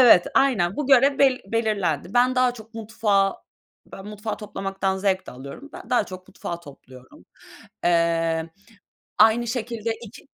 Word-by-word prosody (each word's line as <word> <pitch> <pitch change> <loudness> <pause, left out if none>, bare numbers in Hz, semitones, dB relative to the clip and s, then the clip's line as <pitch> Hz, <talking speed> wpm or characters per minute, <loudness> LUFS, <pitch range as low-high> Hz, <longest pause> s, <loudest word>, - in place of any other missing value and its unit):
Evet, 225 -8 +7
aynen 205 -10 +2
bu 295 - -2
görev 275 +1 +5
bel 265 -2 +4
belirlendi. 200 - -1
Ben 250 +1 +4
daha 255 -1 +3
çok 225 0 -14
mutfağı 210 -3 +1 0.6
ben 195 +1 -9
mutfağı 210 +1 -5
toplamaktan 195 -2 -3
zevk 190 -1 0
de - - -7
alıyorum. 140 - -10
Ben - - -11
daha 245 -4 +3
çok 185 -1 -11
mutfağı 170 0 -6
topluyorum. 130 -4 -15 0.6
Eee, 165 -1 +1 0.7
aynı 225 +2 +5
şekilde 230 -1 -3
iki 225 +1 -12
210 Hz, 145 wpm, -23 LUFS, 175-240 Hz, 0.7 s, Evet